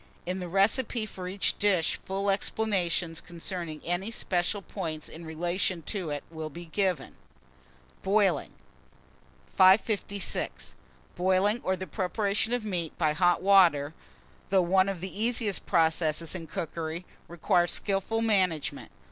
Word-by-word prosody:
In 185 +1 -2
the 180 - -4
recipe 215 +5 +1
for 185 -3 -7
each 190 +2 -1
dish, 190 -5 +2
full 195 +1 -1
explanations 185 -5 0
concerning 170 -2 -5
any 175 +5 -1
special 190 -2 -1
points 160 -7 -5
in 165 +1 -10
relation 175 +2 -1
to 185 -1 -3
it 145 -1 -3
will 160 -1 -5
be 170 +3 -9
given. 185 +1 -1 0.8
BOILING. 195 -1 +2 1.0
556. 200 +1 +2 0.4
BOILING, 190 +5 +2
or 190 - +1
the 185 - -6
preparation 200 +5 -1
of 245 -3 -1
meat 175 -6 -3
by 155 -3 +2
hot 175 +2 +2
water, 170 -7 +5 0.6
though 190 -1 +4
one 190 +2 +3
of 190 -4 -4
the 190 +3 -5
easiest 225 -3 0
processes 160 -2 +1
in 170 -3 -6
cookery, 165 +2 -4 0.2
requires 175 +1 +2
skilful 205 +3 0
management. 185 -9 0
185 Hz, 130 wpm, -28 LUFS, 170-200 Hz, 1.0 s, water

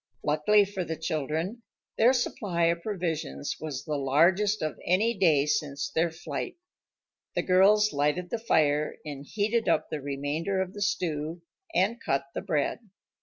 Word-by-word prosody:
Luckily 155 +8 +4
for 195 -2 -4
the 165 -1 -4
children, 160 - -2 0.3
their 235 +3 +5
supply 205 -8 -1
of 170 0 +2
provisions 165 - -3
was 145 -4 -5
the 150 -2 -2
largest 175 +10 +3
of 155 - -3
any 210 +6 +2
day 160 -8 +4
since 145 -1 -1
their 170 +1 +2
flight. 160 - -5 0.8
The - - +1
girls 205 +3 +4
lighted 150 +5 0
the 235 - -1
fire 150 -8 +2
and 140 -2 -6
heated 215 +7 0
up - - +1
the 150 - -3
remainder 145 +7 -2
of 190 0 -2
the 205 - -8
stew 165 -4 -2 0.3
and 225 +5 +2
cut 135 0 0
the - - -3
bread. 145 -2 -1
165 Hz, 155 wpm, -28 LUFS, 150-200 Hz, 0.8 s, their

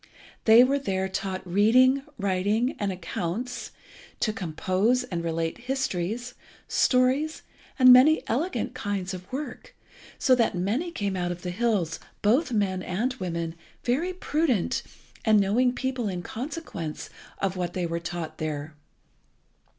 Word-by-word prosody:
They 225 +2 +8
were 275 +2 +2
there 190 -7 -1
taught 190 0 -4
reading, 240 +9 +4 0.2
writing, 200 +5 +1
and 205 -1 0
accounts, 185 +6 -4 0.5
to 215 - +1
compose 190 +7 0
and 175 -8 -4
relate 165 +3 -2
histories, 245 -2 -2 0.3
stories, 260 +5 +2 0.3
and 255 -2 +9
many 290 +6 +6
elegant 315 +4 -1
kinds 205 -5 -3
of 185 0 -9
work, 270 -1 -6 0.4
so 260 - +4
that 235 -6 +2
many 215 - -1
came 200 - -2
out 175 -1 -1
of 175 0 -7
the 180 - -3
hills, 195 -6 0 0.2
both 250 +9 +3
men 195 -4 0
and 215 +9 -1
women, 170 -2 -3 0.3
very 290 +10 0
prudent 295 - 0 0.4
and 215 -2 +5
knowing 225 +6 +3
people 255 -2 -2
in 180 -2 -4
consequence 230 - -6 0.3
of 195 -1 -1
what 175 -2 -3
they 180 -2 -1
were 170 0 -2
taught 170 -1 -5
there. 155 -1 -4
205 Hz, 135 wpm, -26 LUFS, 180-255 Hz, 0.5 s, and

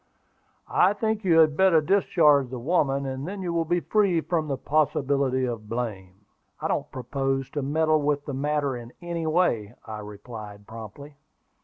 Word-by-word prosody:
I 190 +3 +4
think 220 +1 -1
you 170 -4 +4
had 155 -2 +5
better 190 -2 +5
discharge 155 -6 +3
the 130 - -5
woman, 140 0 +1
and 135 +2 -4
then 195 0 -5
you 175 -2 -2
will 165 -1 +1
be 175 +2 +1
free 200 -5 +2
from 160 -1 -1
the 135 -2 -2
possibility 140 -3 +1
of 115 -4 -5
blame." 105 -5 -5 0.3
"I - - -2
don't - - -1
propose 135 +1 -2
to 145 - -2
meddle 155 +2 +2
with 145 0 0
the 140 - -4
matter 145 0 0
in 120 0 -9
any 170 -2 -3
way," 125 - +1
I 110 -1 -6
replied 105 0 -9
promptly. 115 +7 -10
140 Hz, 170 wpm, -26 LUFS, 125-165 Hz, 0.3 s, had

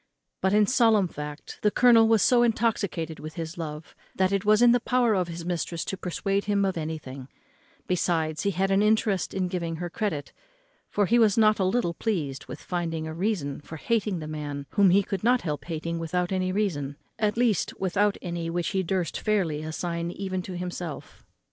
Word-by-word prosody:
But, 190 - +2
in 210 0 +5
solemn 220 -4 +4
fact, 150 -1 -8
the 210 - +4
colonel 230 0 +6
was 225 -2 +4
so 245 -1 +5
intoxicated 205 -9 0
with 155 +1 -8
his 165 -1 -5
love, 155 -2 -6 0.2
that 190 0 +2
it 200 -1 0
was 215 +2 +4
in 240 - +7
the 245 - +4
power 245 -1 +2
of 185 -3 +1
his 170 0 -7
mistress 170 -1 -2
to - - -3
have - - -22
persuaded 195 +2 -1
him 200 -1 +2
of 190 - -1
anything; 155 -5 -5 0.6
besides, 165 -3 0
he 200 - +1
had 195 +1 0
an 195 +1 +4
interest 210 -3 +2
in 185 -1 -1
giving 170 -2 -3
her 175 +1 -5
credit, 165 -10 -3 0.6
for 205 - +1
he 235 +5 +3
was 220 -3 +4
not 215 -1 +4
a - - +2
little 185 -3 +1
pleased 160 - -3
with - - -8
finding 165 -3 -2
a 160 - -5
reason 165 -7 -2
for 160 +2 -9
hating 210 +1 0
the 155 -2 -6
man 145 -2 -5
whom 200 -2 +5
he 195 +3 +4
could 195 0 -4
not 245 +2 +4
help 150 -4 -4
hating 170 0 -3
without 175 +2 -1
any 185 -1 0
reason, 160 -9 -1 0.2
at 215 0 +1
least, 235 -5 +2
without 195 +2 +1
any 170 -2 -3
which 175 +2 -1
he 195 -2 0
durst 180 -3 -2
fairly 185 -9 0
assign 170 +2 -3
even 185 0 -3
to 180 0 -6
himself. 175 -3 -6
185 Hz, 200 wpm, -26 LUFS, 165-210 Hz, 0.6 s, in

